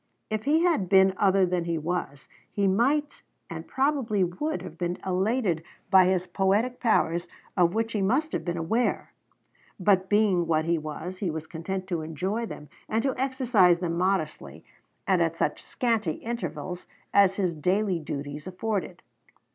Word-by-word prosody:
If 215 +1 -2
he 315 +4 +3
had 315 - +2
been 190 0 +6
other 195 -1 +4
than 180 -1 -1
he 170 -1 -1
was, 155 -4 -4 0.2
he 200 - 0
might 265 +10 +1 0.3
and - - -6
probably 265 -7 +1
would 240 - -2
have 160 - -9
been 175 +1 -2
elated 190 -1 0 0.3
by 190 -1 +7
his 185 -1 +1
poetic 200 +7 +1
powers, 175 -7 +1 0.3
of 175 0 +3
which 225 +1 -1
he 210 - 0
must 270 +11 +1
have - - -2
been 175 -1 -3
aware; 220 +9 -1 0.7
but 190 0 +3
being 205 -5 +3
what 160 -1 +1
he 170 0 +1
was, 155 +4 -6
he 190 - -1
was 160 0 -4
content 185 +3 -5
to 170 -3 -1
enjoy 190 +9 -3
them 150 - -9 0.2
and 225 +1 0
to 270 -1 0
exercise 250 -9 +3
them 170 -1 -2
modestly, 155 - -2 0.4
and 185 -2 +2
at 165 0 0
such 150 - -1
scanty 225 -9 -1
intervals 225 -5 -5 0.3
as 195 -1 +5
his 185 -4 0
daily 185 +4 0
duties 145 0 -6
afforded. 190 +1 -3
190 Hz, 165 wpm, -27 LUFS, 170-220 Hz, 0.7 s, by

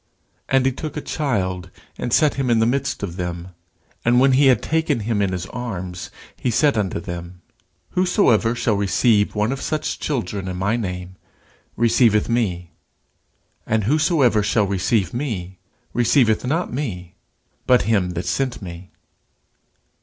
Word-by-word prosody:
And 135 -1 +3
he 135 - +3
took 150 +3 -6
a - - -2
child, 95 - -2 0.3
and 120 - -4
set 150 +3 +4
him 135 -2 -1
in 115 - +4
the 110 - +3
midst 130 0 -1
of 90 -3 -5
them: 90 -1 -4 0.5
and 120 +1 +4
when 135 +1 +5
he 135 +2 +5
had 125 -4 +4
taken 160 -6 0
him 105 -1 -1
in 100 -2 +1
his 90 -1 -3
arms, 95 -7 -6 0.3
he 125 - -2
said 140 +4 +3
unto 100 -6 -1
them, 85 +1 -8 0.5
Whosoever 180 - +2
shall 115 -2 +1
receive 105 +2 +2
one 105 +3 +1
of 135 - -4
such 155 -1 -2
children 100 -8 -3
in 90 -1 -4
my 100 +5 0
name, 90 -4 -5 0.6
receiveth 115 -2 +3
me; 90 -8 -1 1.0
and 110 -1 +1
whosoever 140 - +3
shall 105 0 +2
receive 95 +1 0
me, 100 -9 -4 0.3
receiveth 120 -1 +3
not 165 +3 -1
me, 90 - -4 0.5
but 125 -1 +5
him 95 -5 +1
that 85 - -3
sent 130 -3 -1
me. 90 -2 -9
110 Hz, 155 wpm, -21 LUFS, 95-130 Hz, 1.0 s, when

